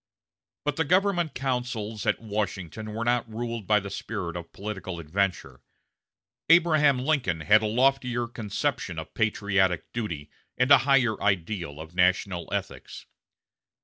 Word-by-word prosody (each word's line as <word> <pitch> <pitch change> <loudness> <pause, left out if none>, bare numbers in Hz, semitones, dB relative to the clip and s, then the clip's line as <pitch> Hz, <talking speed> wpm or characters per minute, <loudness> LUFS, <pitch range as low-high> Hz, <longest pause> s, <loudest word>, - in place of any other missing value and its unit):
But 145 -1 -1
the 160 - +2
government 180 0 +1
councils 125 -5 -3
at - - +2
Washington 105 -1 -4
were 115 +1 -2
not 120 -1 0
ruled 115 -2 -4
by 105 -1 +4
the 100 0 -7
spirit 100 -5 -4
of 85 -1 -7
political 95 -3 -6
adventure. 90 +4 -2 0.9
Abraham 155 -5 +5
Lincoln 125 - 0
had 105 +7 +5
a 110 - 0
loftier 125 0 +1
conception 110 - -3
of 80 - -7
patriotic 100 -5 0
duty, 85 -11 -4 0.3
and 125 +2 +2
a 140 - +10
higher 125 -6 +3
ideal 90 -5 -1
of 80 +1 -9
national 90 0 +1
ethics. - - -5
110 Hz, 135 wpm, -26 LUFS, 95-125 Hz, 0.9 s, a